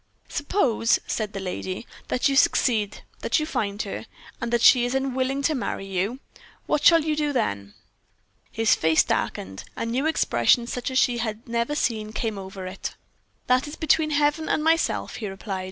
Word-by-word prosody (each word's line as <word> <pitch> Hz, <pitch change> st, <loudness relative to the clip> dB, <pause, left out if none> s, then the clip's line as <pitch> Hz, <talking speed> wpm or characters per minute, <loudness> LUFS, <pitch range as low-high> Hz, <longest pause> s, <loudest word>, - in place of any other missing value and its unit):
"Suppose," 280 Hz, -, +1 dB
said 215 Hz, -2 st, -3 dB
the 195 Hz, -, -4 dB
lady, 185 Hz, +2 st, -4 dB, 0.2 s
"that 250 Hz, +3 st, +1 dB
you 275 Hz, -, +1 dB
succeed, 220 Hz, -6 st, +2 dB, 0.2 s
that -, -, +1 dB
you 305 Hz, -, -1 dB
find 205 Hz, -8 st, -2 dB
her, 205 Hz, +2 st, -6 dB, 0.3 s
and 235 Hz, 0 st, -2 dB
that 240 Hz, -1 st, +1 dB
she 250 Hz, -2 st, +7 dB
is 245 Hz, +2 st, -1 dB
unwilling 265 Hz, +1 st, -1 dB
to 310 Hz, -, +2 dB
marry 245 Hz, -7 st, -3 dB
you 195 Hz, +6 st, -2 dB, 0.5 s
what 295 Hz, -, 0 dB
shall 330 Hz, -2 st, +7 dB
you 310 Hz, -1 st, +1 dB
do 300 Hz, -1 st, 0 dB
then?" 100 Hz, -, -2 dB, 0.8 s
His 225 Hz, 0 st, +3 dB
face 160 Hz, 0 st, +3 dB
darkened 95 Hz, 0 st, -3 dB
a -, -, -3 dB
new 255 Hz, +6 st, 0 dB
expression 235 Hz, -, +3 dB
such 250 Hz, +1 st, -3 dB
as 260 Hz, -, -1 dB
she 245 Hz, -2 st, +3 dB
had 225 Hz, 0 st, -4 dB
never 235 Hz, +5 st, -1 dB
seen 220 Hz, -6 st, -1 dB
came 215 Hz, -2 st, -2 dB
over 190 Hz, 0 st, -8 dB
it. 185 Hz, +1 st, -6 dB, 0.5 s
"That 255 Hz, +3 st, +2 dB
is 295 Hz, -, -7 dB
between 315 Hz, -1 st, +2 dB
Heaven 295 Hz, +1 st, +1 dB
and 305 Hz, -, +1 dB
myself," 325 Hz, +1 st, +1 dB
he 215 Hz, -, -4 dB
replied. 195 Hz, 0 st, -5 dB
235 Hz, 180 wpm, -25 LUFS, 200-285 Hz, 0.8 s, she